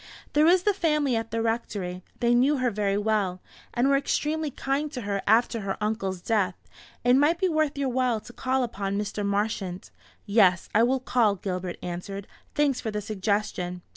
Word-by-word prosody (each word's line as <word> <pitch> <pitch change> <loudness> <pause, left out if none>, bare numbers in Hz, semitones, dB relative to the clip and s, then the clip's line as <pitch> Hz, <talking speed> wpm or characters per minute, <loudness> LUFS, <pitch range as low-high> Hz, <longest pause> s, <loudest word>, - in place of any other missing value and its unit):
"There 300 +2 +5
is 360 +1 +5
the 415 - +3
family 300 -8 +1
at 225 0 -2
the 225 +1 -1
Rectory; 205 -6 -2 0.2
they 240 0 +3
knew 265 +5 +4
her 255 -2 +1
very 200 -1 0
well, 205 -4 0 0.3
and 245 +3 +1
were 275 - +4
extremely 300 +2 -1
kind 280 +2 -2
to 250 - -4
her 200 -2 -2
after 230 +2 +3
her 195 -2 -3
uncle's 210 -4 -2
death. 200 -5 +1 0.5
It 245 +1 +5
might 300 +4 +3
be 375 +1 +1
worth 310 -4 0
your 275 -1 0
while 250 -2 +1
to 240 - -13
call 260 +1 0
upon 200 -4 -3
Mr. 205 0 -3
Marchant." 200 -2 -2 0.3
"Yes, 195 -4 +3
I 215 - +5
will 255 +2 +2
call," 235 -5 +2
Gilbert 180 -2 -4
answered; 185 +3 -5 0.3
"thanks 285 -3 +2
for 225 - -3
the 210 -1 -2
suggestion." 195 -3 -2
225 Hz, 185 wpm, -26 LUFS, 200-265 Hz, 0.5 s, There